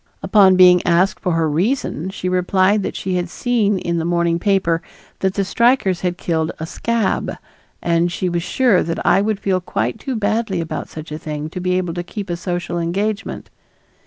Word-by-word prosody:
Upon 195 Hz, -3 st, +5 dB
being 180 Hz, -1 st, +7 dB
asked 175 Hz, +3 st, +2 dB
for 180 Hz, -, -1 dB
her 165 Hz, -1 st, +1 dB
reason 180 Hz, -, -1 dB
she 185 Hz, -1 st, -5 dB
replied 185 Hz, +3 st, +2 dB
that -, -, -4 dB
she 185 Hz, -1 st, -2 dB
had 175 Hz, 0 st, -2 dB
seen 215 Hz, -2 st, +1 dB
in 170 Hz, -2 st, -2 dB
the -, -, -2 dB
morning 170 Hz, 0 st, +1 dB
paper 180 Hz, -4 st, +1 dB, 0.4 s
that 190 Hz, 0 st, 0 dB
the 200 Hz, -, 0 dB
strikers 235 Hz, -4 st, +2 dB
had 180 Hz, -1 st, -1 dB
killed 160 Hz, -2 st, -1 dB
a 160 Hz, -, -3 dB
"scab" 230 Hz, +4 st, -1 dB, 0.5 s
and 170 Hz, 0 st, +1 dB
she 180 Hz, +2 st, -2 dB
was 175 Hz, -1 st, -1 dB
sure 230 Hz, +1 st, +2 dB
that 165 Hz, 0 st, -3 dB
I 195 Hz, -, +4 dB
would 210 Hz, -1 st, -1 dB
feel 190 Hz, -2 st, 0 dB
quite 120 Hz, -8 st, -2 dB
too 265 Hz, -, -4 dB
badly 215 Hz, -2 st, 0 dB
about 165 Hz, -1 st, -4 dB
such 155 Hz, -1 st, -9 dB
a 155 Hz, -, -5 dB
thing 150 Hz, 0 st, -5 dB
to 185 Hz, -, -5 dB
be 180 Hz, 0 st, +1 dB
able 180 Hz, -2 st, -2 dB
to 175 Hz, -, -3 dB
keep 195 Hz, +1 st, -6 dB
a -, -, 0 dB
social 175 Hz, 0 st, -3 dB
engagement. 200 Hz, +5 st, -3 dB
180 Hz, 195 wpm, -19 LUFS, 170-200 Hz, 0.5 s, being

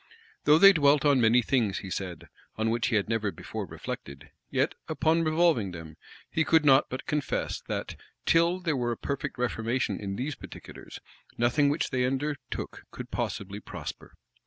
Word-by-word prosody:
Though 150 Hz, +1 st, +7 dB
they 195 Hz, +3 st, +9 dB
dwelt 145 Hz, -2 st, +4 dB
on 140 Hz, -3 st, +4 dB
many 120 Hz, +2 st, +5 dB
things, 110 Hz, -6 st, +1 dB
he 95 Hz, -, -7 dB
said, 90 Hz, -3 st, -5 dB, 0.3 s
on 110 Hz, +1 st, 0 dB
which 115 Hz, -1 st, 0 dB
he 115 Hz, -, 0 dB
had 105 Hz, -, +1 dB
never 110 Hz, -2 st, 0 dB
before 80 Hz, -, -6 dB
reflected, 70 Hz, 0 st, -8 dB, 0.2 s
yet, -, -, +1 dB
upon 165 Hz, +1 st, +2 dB
revolving 155 Hz, -, +2 dB
them, 80 Hz, -2 st, -9 dB, 0.4 s
he 160 Hz, -, +2 dB
could 160 Hz, -1 st, +3 dB
not 135 Hz, -1 st, +5 dB
but 130 Hz, +1 st, -5 dB
confess 150 Hz, -2 st, -2 dB
that, -, -, -4 dB, 0.3 s
till 170 Hz, +2 st, +3 dB
there 165 Hz, -4 st, 0 dB
were 120 Hz, -2 st, -1 dB
a -, -, -8 dB
perfect 140 Hz, -2 st, -4 dB
reformation 120 Hz, 0 st, -1 dB
in 100 Hz, -1 st, -4 dB
these 135 Hz, +7 st, -3 dB
particulars, -, -, -11 dB, 0.4 s
nothing 125 Hz, +5 st, +3 dB
which 145 Hz, +3 st, -1 dB
they 125 Hz, -1 st, +1 dB
undertook 135 Hz, 0 st, -3 dB
could -, -, -9 dB
possibly 100 Hz, -1 st, -3 dB
prosper. -, -, -8 dB
130 Hz, 170 wpm, -28 LUFS, 110-150 Hz, 0.4 s, they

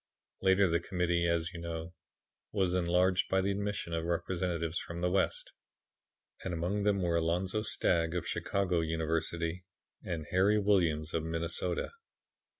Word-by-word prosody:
Later 95 Hz, +1 st, +5 dB
the 85 Hz, 0 st, +2 dB
Committee, 85 Hz, -2 st, 0 dB
as 85 Hz, 0 st, 0 dB
you 85 Hz, -, -6 dB
know, 85 Hz, 0 st, -5 dB, 0.6 s
was 95 Hz, -4 st, +1 dB
enlarged 90 Hz, +1 st, +2 dB
by 95 Hz, -, +3 dB
the 95 Hz, +1 st, +1 dB
admission 100 Hz, -3 st, -2 dB
of 80 Hz, -1 st, -1 dB
representatives 85 Hz, -1 st, -1 dB
from 85 Hz, 0 st, -6 dB
the 90 Hz, 0 st, +1 dB
West; 95 Hz, 0 st, 0 dB, 0.9 s
and 90 Hz, -2 st, -2 dB
among 90 Hz, +5 st, -1 dB
them 100 Hz, -2 st, +2 dB
were 85 Hz, -1 st, +2 dB
Alonzo 90 Hz, +5 st, 0 dB
Stagg, 85 Hz, -5 st, +1 dB
of 90 Hz, -, -2 dB
Chicago 95 Hz, -3 st, 0 dB
University, 80 Hz, +2 st, -1 dB, 0.4 s
and 85 Hz, -4 st, -4 dB
Harry 100 Hz, +3 st, +4 dB
Williams 85 Hz, -7 st, +2 dB
of 80 Hz, -, 0 dB
Minnesota. 85 Hz, +2 st, -1 dB
85 Hz, 145 wpm, -32 LUFS, 85-95 Hz, 0.9 s, Later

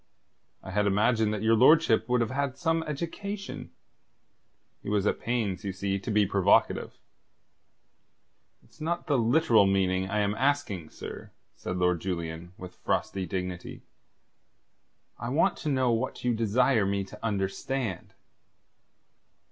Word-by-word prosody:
"I 95 Hz, -, -8 dB
had 105 Hz, +1 st, +1 dB
imagined 105 Hz, +2 st, +2 dB
that 105 Hz, -1 st, -3 dB
your 110 Hz, +1 st, +4 dB
lordship 125 Hz, -2 st, +5 dB
would 125 Hz, -1 st, +3 dB
have 115 Hz, -, -1 dB
had 140 Hz, 0 st, -2 dB
some 165 Hz, +1 st, +1 dB
education." 195 Hz, +7 st, -5 dB, 1.1 s
He -, -, -6 dB
was 105 Hz, -1 st, +1 dB
at -, -, +1 dB
pains, 110 Hz, -6 st, -2 dB
you 100 Hz, -, -2 dB
see, 95 Hz, +1 st, -2 dB
to 100 Hz, -, -7 dB
be 105 Hz, -1 st, +3 dB
provocative. -, -, +2 dB, 1.7 s
"It's -, -, -22 dB
not 170 Hz, +2 st, -2 dB
the 140 Hz, -4 st, +2 dB
literal 115 Hz, -3 st, +4 dB
meaning 95 Hz, -1 st, +1 dB
I 105 Hz, +1 st, 0 dB
am 100 Hz, 0 st, +1 dB
asking, 110 Hz, -, -1 dB
sir," -, -, -9 dB, 0.2 s
said 90 Hz, -, -5 dB
Lord 90 Hz, -2 st, +1 dB
Julian, 85 Hz, -2 st, -4 dB
with 90 Hz, -1 st, -9 dB
frosty 95 Hz, -1 st, -2 dB
dignity. 90 Hz, 0 st, -5 dB, 1.4 s
"I 120 Hz, -, -4 dB
want 165 Hz, +8 st, +2 dB
to 155 Hz, -, -3 dB
know 130 Hz, -3 st, +2 dB
what 115 Hz, +3 st, -2 dB
you 125 Hz, -1 st, +2 dB
desire 115 Hz, 0 st, +2 dB
me 100 Hz, 0 st, 0 dB
to 95 Hz, -, -13 dB
understand?" 105 Hz, +1 st, -3 dB
110 Hz, 140 wpm, -28 LUFS, 95-130 Hz, 1.7 s, lordship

